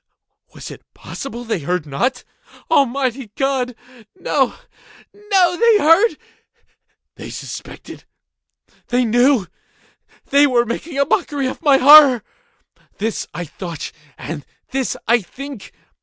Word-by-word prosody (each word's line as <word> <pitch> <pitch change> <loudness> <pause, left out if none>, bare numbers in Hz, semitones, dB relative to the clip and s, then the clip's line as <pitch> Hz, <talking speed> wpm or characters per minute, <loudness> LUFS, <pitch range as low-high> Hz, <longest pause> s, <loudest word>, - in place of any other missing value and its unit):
Was - - -9
it - - -11
possible 240 -3 -8
they 225 -5 -2
heard 175 +2 -2
not? 245 - -2 0.5
Almighty 265 -4 +1
God!—no, 250 - -2 0.6
no! 385 -4 +1
They 460 0 +5
heard!—they 385 +6 -2
suspected!—they 245 0 -7
knew!—they 245 +4 0
were 240 -3 +2
making 275 +6 -5
a 280 - +3
mockery 290 -6 -1
of 260 - -4
my 285 -4 +5
horror!—this 260 -5 +3
I 175 - -6
thought, 170 0 -7 0.3
and 150 -1 -7 0.3
this 265 -1 -2
I 235 +1 +3
think. 270 +3 -10
255 Hz, 95 wpm, -19 LUFS, 225-290 Hz, 0.6 s, They